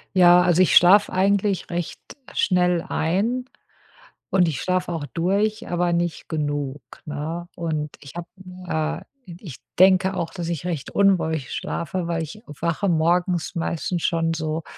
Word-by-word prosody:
Ja, 175 -1 +7
also 180 0 +3
ich - - +2
schlafe 195 +4 +6
eigentlich 195 +1 +1
recht 175 -1 -4 0.3
schnell 180 -2 +2
ein 215 +10 0 0.9
und 180 -2 +4
ich 150 -6 -2
schlafe 185 -1 -1
auch 155 -3 -3
durch, 200 +5 0
aber 175 0 +1
nicht 170 -1 -2
genug, 145 -3 -2 0.2
ne? 155 +4 -5
Und 155 -3 -3
ich 140 - -12
habe 175 -3 -5 0.2
äh, 170 - -8
ich 150 -9 -8 0.2
denke 190 0 +5
auch, 170 -2 -3
dass 170 -2 -5
ich 170 0 -4
recht 165 -6 -3
unruhig 160 -8 +1
schlafe, 170 +1 -3
weil 165 -1 -1
ich 185 +8 -9
wache 170 +6 -2
morgens 175 +1 +1
meistens 170 +1 -2
schon 165 -1 +1
so, 160 0 -3
175 Hz, 145 wpm, -23 LUFS, 160-185 Hz, 0.9 s, Ja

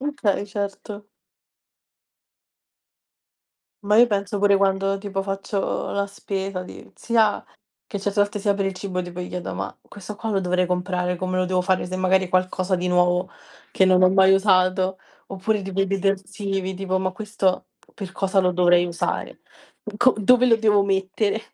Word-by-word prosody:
Okay, 255 -9 -1
certo. 205 0 -6 2.8
Ma 210 +1 +3
io 240 +2 +7
penso 200 -2 -2
pure 200 0 +4
quando 195 0 +1
tipo 195 -1 -4
faccio 195 0 -3
la 200 0 -1
spesa 195 -1 -5
di 180 - -12
sia 225 -3 +1 0.4
che 205 -4 -5
certe 205 +1 -1
volte 205 +1 0
sia 200 0 +1
per 200 0 -2
il 195 - -1
cibo 185 -1 -4
tipo, 175 0 -7
gli 180 - -5
chiedo: 180 -1 -5
"Ma - - -5
questo 205 +1 -10
qua 225 - -4
lo 195 -2 +1
dovrei 180 0 0
comprare, 180 0 -1
come 185 +1 -3
lo 185 - +1
devo 185 0 0
fare?" 185 0 0
Se 185 - -6
magari 185 0 +2
qualcosa 185 +1 0
di 180 0 -1
nuovo 180 +1 +2 0.4
che 190 - +3
non 185 0 +4
ho 185 - +7
mai 190 0 +5
usato 190 -1 +2 0.3
oppure 195 +2 -2
tipo 195 0 -3
i - - -1
detersivi 195 0 -2
tipo: 190 0 -2
"Ma 185 0 -1
questo 205 -2 -1 0.3
per 195 -3 -7
cosa 195 0 +1
lo 180 -1 +2
dovrei 175 0 +3
usare? 170 -1 -4 0.6
Co 255 +3 +4
dove 250 +4 +4
lo 230 -2 +5
devo 210 -2 +3
mettere?" 195 +2 -1
195 Hz, 165 wpm, -23 LUFS, 185-200 Hz, 2.8 s, io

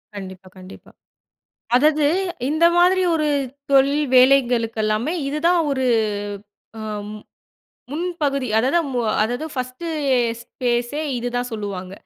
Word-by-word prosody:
கண்டிப்பா, 190 -1 -9
கண்டிப்பா. 185 0 -13 0.9
அதாவது, 300 +2 +3 0.4
இந்த 315 +3 +1
மாதிரி 370 +1 +4
ஒரு 305 -2 0 0.4
தொழில் 280 +2 +4
வேலைகளுகெல்லாமே 240 -1 +3
இதுதான் 335 +4 +2
ஒரு 265 -2 0 0.9
ஆ - - -7 0.3
ம், 210 0 -8 0.7
முன்பகுதி 295 -5 -2
அதாவது, 265 +9 +2 0.4
அதாவது 245 +8 -2
ஃபர்ஸ்ட்டு 255 +5 -5 0.6
ஸ்பேஸே 245 +4 -2 0.2
இதுதான் 245 +1 -3
சொல்லுவாங்க 195 -4 -5
255 Hz, 95 wpm, -21 LUFS, 230-300 Hz, 0.9 s, மாதிரி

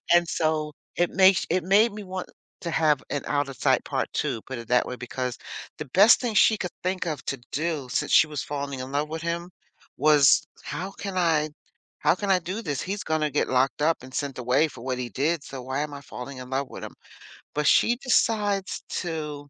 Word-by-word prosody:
And 175 0 +5
so, 155 -2 0 0.2
it 175 0 +2
makes 190 -1 +5
it 180 +2 +2
made 200 +6 +4
me 210 0 -7
want 185 0 -5 0.3
to 170 - -3
have 155 -4 +2
an 145 - -2
Out 145 -1 0
of 130 - -9
Sight - - +2
part - - -2
2, 115 - -1
put 130 -2 -6
it 115 -1 -9
that 125 0 +3
way, 125 - -5
because 125 0 -4 0.4
the - - -4
best 200 - +6
thing 245 -3 -1
she 220 +2 +5
could 180 -4 -4
think 185 0 -1
of 150 -4 -3
to 140 - -1 0.2
do, 155 -3 -2
since - - -1
she - - +7
was 150 -3 -4
falling 140 -2 -4
in 130 +1 -6
love 145 +2 0
with 160 +1 -4
him, 170 +1 -3 0.5
was, 150 -2 +5 0.2
"How 170 +7 -5
can 195 -1 -6
I 160 -3 +2 0.5
how - - +3
can 200 0 -3
I 185 - +5
do 185 +6 -4
this? 145 - -2
He's 200 +2 -4
gonna 155 -1 0
get - - 0
locked 130 +1 +1
up 160 -2 +2
and 130 0 -12
sent 140 -2 -3
away 125 +5 +3
for 115 - -12
what 130 -1 -2
he 125 -1 -3
did, 145 - 0
so 135 -2 -7
why 130 +2 -3
am 150 -1 -3
I 140 - -7
falling 130 -1 -8
in 125 0 -9
love 135 0 -1
with - - -9
him?" - - -9 0.6
But 150 0 0
she 235 - +5
decides 210 -6 +1 0.2
to 150 -4 -5
150 Hz, 220 wpm, -26 LUFS, 135-180 Hz, 0.6 s, she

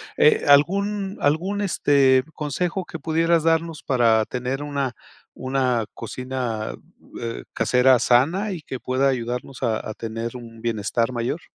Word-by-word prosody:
Eh, 150 - +4
¿algún 195 +7 +3
algún, 175 +8 0
este, 140 -8 +3
consejo 170 +5 -2
que 165 - -7
pudieras 165 +1 +1
darnos 165 -1 0
para 115 -4 +3
tener 125 +4 -3
una 140 -3 -2 0.5
una 130 -3 0
cocina, 125 -4 -4 0.5
eh, 115 -1 -5
casera 125 0 +4
sana 165 - +2
y 175 - -6
que 130 -3 -7
pueda 130 +3 +1
ayudarnos 125 +1 -4
a 110 -2 0
a - - -4
tener 115 +1 -5
un 115 -2 -12
bienestar 115 +1 -1
mayor? 125 +7 -2
130 Hz, 135 wpm, -23 LUFS, 120-160 Hz, 0.5 s, Eh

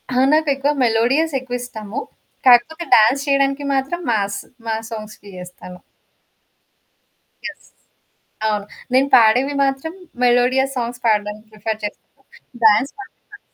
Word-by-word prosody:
ఆ! - - +1 0.2
నాకెక్కువ 290 -2 +2
మెలోడియస్ 250 +8 +2
ఎక్కువ 245 -1 -5
ఇస్టము. 220 0 -6 0.5
కాకపోతే 255 +7 +5
డాన్స్ 265 +6 +4
చేయడానికి 275 0 +1
మాత్రం 270 +6 -1
మాస్సు. 200 -2 -2 0.2
మాస్ 225 0 -3
సాంగ్స్‌కి 215 -2 -9
చేస్తాను. 180 0 -10 1.7
యెస్. - - -8 0.8
అవును. 210 -1 -2 0.3
నేను 265 +2 +3
పాడేవి 250 +4 +5
మాత్రం 270 +4 -2 0.3
మెలోడియా 250 +2 +3
సాంగ్స్ 245 +1 -4
పాడడానికి 210 0 0
ప్రిఫర్ 215 0 -4
చేశాను. 210 - -7 0.5
డాన్స్ 220 +6 +4
మాత్రం 400 - -13
మాస్. 410 - -12
245 Hz, 115 wpm, -19 LUFS, 215-275 Hz, 1.7 s, కాకపోతే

